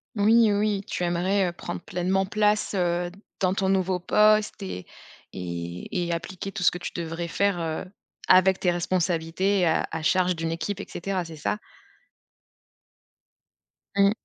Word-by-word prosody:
Oui, 220 +2 +5
heu, 205 - +2
oui, 210 -2 +1
tu 180 - -3
aimerais, 185 +3 +1
heu, - - -5
prendre 175 0 -6
pleinement 185 +2 0
place, 210 +1 +1
heu, 175 -1 0 0.3
dans 185 -1 +2
ton 195 -1 0
nouveau 185 -1 +1
poste 215 +3 +3
et 90 - -6 0.5
et 90 - -4
et - - -2
appliquer 175 +3 -4
tout 195 -3 -4
ce - - +6
que 180 - -6
tu - - -5
devrais 170 0 -3
faire, 200 +1 +1
heu, 160 +2 -3 0.4
avec 185 +1 +5
tes 180 - +2
responsabilités 175 +2 0
et 180 - +3
à 160 - +1
à 160 - -3
charge 180 +2 +2
d'une 165 0 -2
équipe 175 +5 -3
et - - -6
cetera, 185 0 -2
c'est 165 -1 -9
ça? 180 +8 -2 2.4
Mmh. 200 0 +6
180 Hz, 165 wpm, -26 LUFS, 170-195 Hz, 2.4 s, ce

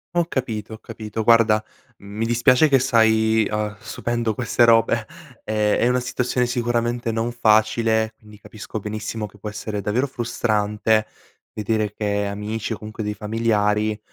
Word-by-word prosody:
Ho 175 - +3
capito, 115 - -4
ho - - -7
capito. 110 -1 -6
Guarda, 110 -1 +4 0.3
mi 100 +3 -5
dispiace 120 +5 +4
che 135 -1 +5
stai, 110 -3 +3
uhm, 105 -1 -2
subendo 120 -2 -2
queste 120 0 +1
robe. 115 -1 +3 0.4
Ehm, 105 -1 +1
è 120 - +2
una 125 0 +2
situazione 125 0 -1
sicuramente 120 -1 -1
non 115 +2 -1
facile 110 -1 +2
quindi 105 -1 -16
capisco 110 +1 -8
benissimo 110 +1 -4
che 105 - -19
può 105 +1 -6
essere 105 0 -5
davvero 120 +8 0
frustrante 110 -3 0 0.5
vedere 110 -1 -1
che 105 -1 -1
amici 105 +3 -4
o - - -5
comunque 110 +1 -7
dei 105 0 -2
familiari, 105 0 0
110 Hz, 150 wpm, -22 LUFS, 105-120 Hz, 0.5 s, che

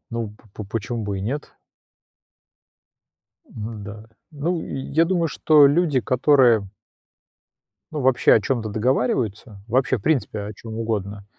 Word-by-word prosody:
Ну, 115 -3 -4 0.2
поч 105 - -6
почему 115 0 -3
бы 100 -1 -3
и - - -5
нет? 135 +9 -4 1.9
Н-да. 105 -1 -8 0.3
Ну, 160 +3 -2
я 150 +5 0
думаю, 170 -1 +1
что 150 -1 +5
люди, 150 -2 +2
которые 125 -5 +3 1.2
ну, 150 -2 -3
вообще, 130 -1 +4
о 110 - +4
чем-то 115 -2 -2
договариваются, 110 -2 -1
вообще, 130 +2 +1
в - - -12
принципе, 135 -8 0
о 105 +1 -6
чем 110 +2 -9
угодно, 105 -3 -3
115 Hz, 125 wpm, -22 LUFS, 105-140 Hz, 1.9 s, что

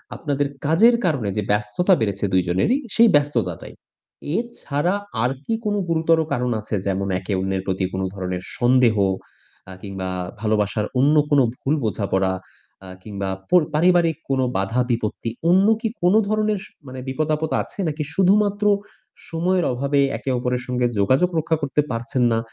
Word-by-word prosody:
আপনাদের 145 -2 -1 0.2
কাজের 220 +11 +5
কারণে 135 - 0
যে - - +2
ব্যস্ততা 105 - +2
বেড়েছে 100 -2 -1
২ 95 - +4
জনেরই 95 - +2 0.2
সেই 230 - +7
ব্যস্ততাটাই। 145 0 -1 0.6
এছাড়া 180 -8 -2 0.3
আর 125 - +2
কি - - -1
কোন 205 -1 0
গুরুতর 165 0 +3
কারণ 125 0 -1
আছে? 105 0 -3
যেমন 100 0 -1
একে 95 +2 -4
অন্যের 95 0 -1
প্রতি 95 0 0
কোন 95 - -2
ধরনের 90 -2 -4 0.2
সন্দেহ 120 -2 +4 0.7
অ্যা 95 0 -10
কিংবা 95 -2 -5 0.3
ভালোবাসার 105 -1 0
অন্য 145 +4 +4
কোন 145 -2 +4 0.2
ভুল 140 - 0
বোঝাপড়া 95 -3 0 0.5
আ - - -10 0.2
কিংবা 100 -2 -4 0.2
পর 180 -2 +6
পারিবারিক 170 -1 +3
কোন 135 -1 +1 0.2
বাধা 110 +6 0
বিপত্তি 115 0 -2 0.2
অন্য 190 +3 +5
কি 230 - 0
কোন 180 +3 +4
ধরনের 215 -1 0
স - - -12 0.2
মানে 130 0 -7
বিপদ-আপদ 155 +3 -1
আছে? - - -9
নাকি 155 0 -2
শুধুমাত্র 205 +2 +2 0.7
সময়ের 175 +1 0
অভাবে 140 +3 0 0.2
একে - - -5
অপরের 125 0 -1
সঙ্গে 125 -1 0
যোগাযোগ 130 - +3
রক্ষা 160 +1 0
করতে 145 +1 +1
পারছেন 120 +2 -1
না, 115 - +2
130 Hz, 155 wpm, -22 LUFS, 105-165 Hz, 0.7 s, সেই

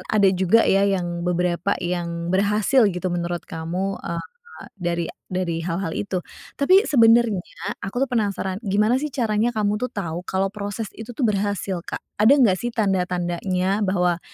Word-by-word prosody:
ada 205 -2 +4
juga 190 +5 +4
ya 195 +1 +4
yang 175 -3 -1
beberapa 180 +1 0
yang 170 -1 -3
berhasil 210 +5 +3
gitu 180 +1 -2
menurut 175 0 -3
kamu, 175 +4 -3
eee, 170 0 -3 0.5
dari 170 -1 -1 0.2
dari 180 -3 -2
hal-hal 170 -1 -2
itu. 190 -3 -2 0.3
Tapi 370 +9 +4
sebenarnya 230 -6 +4 0.4
aku 245 +7 -1
penasaran 200 -5 -1
gimana 210 +4 +2
sih 300 - -2
caranya 230 -3 +1
kamu 210 -2 0
tuh 250 - -1
tahu 175 -3 -4
kalau 190 +1 +1
proses 205 +1 -4
itu 225 +1 -9
tuh 260 - 0
berhasil, 200 -3 -1
Kak? - - -5 0.2
Ada 245 +7 +7
enggak 210 -8 +5
sih 240 - -2
tanda-tandanya 185 -1 0
bahwa 180 -3 +1
195 Hz, 150 wpm, -23 LUFS, 175-215 Hz, 0.5 s, Ada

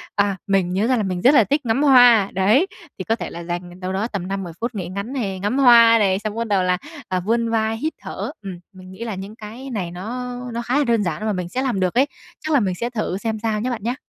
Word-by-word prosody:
À, 200 -2 +1
mình 190 -2 +1
nhớ 205 +5 +1
ra 255 -1 +2
là 215 - 0
mình 185 -2 -3
rất 265 +4 +6
là 250 - +6
thích 285 +6 0
ngắm 235 +5 +1
hoa, 245 -7 +6
đấy, 215 - +3 0.3
thì 185 - -4
có 225 - 0
thể - - -6
là 170 0 -8
dành 175 +1 -6
đâu 185 0 -4
đó 205 +4 -1
tầm 195 -6 -5
5-10 195 -3 -4
phút 235 0 -3
nghỉ 185 -4 -4
ngắn 200 +7 -5
này, 200 -8 -3
ngắm 210 +8 -1
hoa 235 -3 +7
này, 195 -2 +2
xong 215 0 -4
bắt 230 0 -2
đầu 195 -3 +2
là, 180 0 +1 0.3
à, 185 -1 0
vươn 230 +4 0
vai, 225 0 0
hít 310 +7 -2
thở. - - -5
Ừm, 190 -3 -7
mình 185 0 -13
nghĩ 215 +5 -8
là 225 -4 -4
những 195 +3 -8
cái 230 +5 -9
này 190 -8 -3
nó 245 +7 -5 0.2
nó 235 - -2
khá 245 +3 0
là 290 - +3
đơn 230 -4 +1
giản 170 -3 -2
và - - -3
mà 215 - +1
mình 180 -2 -4
sẽ 255 +7 -2
làm 245 -8 -1
được 185 -1 0
ấy, 260 +4 +4 0.3
chắc 310 -1 -3
là 280 - +5
mình 190 -4 -1
sẽ 235 +6 -3
thử 215 -6 -3
xem 220 +1 -3
sao 215 -1 -1
nhá 255 - -1
bạn 230 -4 -4
nhá. 240 +3 -1
215 Hz, 285 wpm, -21 LUFS, 190-240 Hz, 0.3 s, hoa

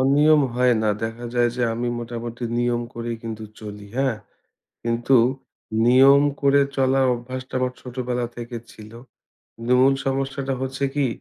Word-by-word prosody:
অনিয়ম 145 +3 +5
হয় 125 -1 +3
না। 110 - +2
দেখা 115 +2 -4
যায় 120 -1 +3
যে 125 - -1
আমি 120 +1 -2
মোটামুটি 120 0 -6
নিয়ম 120 0 0
করেই 115 0 -4
কিন্তু 110 -1 -6 0.2
চলি, 105 -1 -8
হ্যাঁ? 135 -5 +1 0.7
কিন্তু 120 +3 +2 0.7
নিয়ম 135 +3 +7 0.2
করে 140 0 +4
চলার 135 0 +3
অভ্যাসটা 130 +2 -8
আমার 125 0 -1
ছোটবেলা 125 -1 -3
থেকে 120 0 -6
ছিল। 110 0 -13 0.8
ন - - -5
মূল 135 +1 +5
সমস্যাটা 135 0 -1
হচ্ছে 130 +1 -2
কি, 145 -2 +2
125 Hz, 145 wpm, -23 LUFS, 120-135 Hz, 0.8 s, নিয়ম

